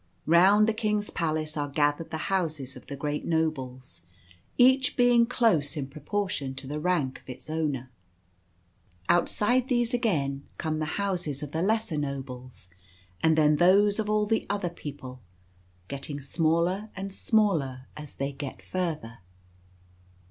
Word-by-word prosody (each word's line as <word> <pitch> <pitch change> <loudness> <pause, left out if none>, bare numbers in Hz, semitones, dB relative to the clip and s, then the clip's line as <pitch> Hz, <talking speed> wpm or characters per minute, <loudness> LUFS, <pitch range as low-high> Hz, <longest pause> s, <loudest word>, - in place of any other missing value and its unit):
Round 190 +6 +6
the 225 - +2
King's 210 -1 -1
palace 155 -2 -2
are 145 -1 -1
gathered 145 +2 +1
the 160 - -3 0.2
houses 155 -8 -1
of - - -13
the 140 - -5
great 145 +1 -3
nobles, 130 - -2 0.6
each 260 +1 +4
being 245 -1 +5
close 175 - +2
in 140 - -2
proportion 150 -1 -3
to 135 +1 -5
the 150 +3 -4
rank 150 -6 0
of - - -19
its 125 +4 -8
owner. 145 -5 -2 1.2
Outside 240 +8 +2
these 240 -1 +1
again 145 - 0
come 155 -1 -2
the 155 0 -3
houses 180 -8 -2
of 145 - -6
the 160 - -1
lesser 210 -5 0
nobles; 130 -6 -6 0.5
and 160 -1 +3
then 150 -1 +4
those 200 +5 +4
of 210 -1 -1
all 210 0 +2
the 220 +1 0
other 200 -3 -1
people, 135 -6 -8 0.7
getting 140 +1 -5
smaller 170 +8 0
and 195 0 -5
smaller 165 - +1
as 150 -2 -10
they 140 +1 -2
get 140 -1 -7
further. 155 -11 -3
160 Hz, 145 wpm, -27 LUFS, 140-205 Hz, 1.2 s, Round